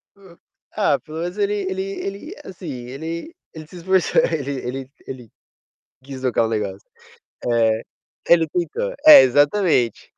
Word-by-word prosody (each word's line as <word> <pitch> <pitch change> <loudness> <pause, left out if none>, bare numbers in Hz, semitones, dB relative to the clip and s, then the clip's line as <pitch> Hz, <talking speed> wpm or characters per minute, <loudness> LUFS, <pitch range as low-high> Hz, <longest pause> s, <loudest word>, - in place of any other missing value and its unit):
hum, 190 -4 -18 0.4
ah, 155 -10 +2
pelo 155 +1 -9
menos 175 +3 -5
ele 205 0 0 0.2
ele 190 0 -3 0.2
ele, 200 - -7
assim, 180 -2 -9 0.2
ele 165 - -6 0.2
ele 155 -1 -10
se 180 - -13
esforçou, 185 +1 +2
ele 140 -4 -2 0.2
ele 130 +1 -5 0.2
ele 125 -4 -9 0.8
quis 135 -1 -9
tocar 125 -3 +1
um - - -3
negócio 100 -3 -4 0.6
é. 115 -1 +2 0.5
Ele 170 -1 +5
tentou, 465 - -3
é 310 - +11
exatamente. 145 - +1
160 Hz, 140 wpm, -21 LUFS, 130-190 Hz, 0.8 s, é